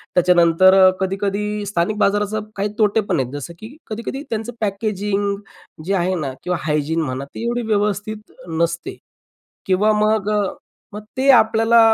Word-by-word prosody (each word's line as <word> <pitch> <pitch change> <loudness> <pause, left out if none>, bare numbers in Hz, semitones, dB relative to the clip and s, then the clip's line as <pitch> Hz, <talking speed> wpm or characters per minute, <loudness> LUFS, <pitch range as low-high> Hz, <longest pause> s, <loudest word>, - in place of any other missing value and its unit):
त्याच्यानंतर 180 +1 +5 0.2
कधी-कधी, 205 +2 -2
स्थानिक 200 +1 -1
बाजाराचं 210 +1 +1
काही 205 +1 -1
तोटेपण 205 -5 +2
आहेत, 130 -1 -2
जसं 145 +4 -6
की 225 +6 -10
कधी-कधी 230 +6 -5
त्यांचं 225 +1 -3
पॅकेजिंग 200 -1 -1 0.5
जे 195 - 0
आहे 185 0 0
ना, 135 -4 -3
किंवा 180 -1 -1
हायजीन, 155 +1 0
म्हणा, 135 -2 -3
ते - - -5
एवढी 240 +1 -1
व्यवस्थित 210 0 -2 0.3
नसते. 170 0 -2 0.7
किंवा 195 +3 +3
मग, 215 -1 +1 0.6
मग 210 - -7
ते 270 +1 +2
आपल्याला 225 +1 +4
205 Hz, 135 wpm, -20 LUFS, 180-215 Hz, 0.7 s, त्याच्यानंतर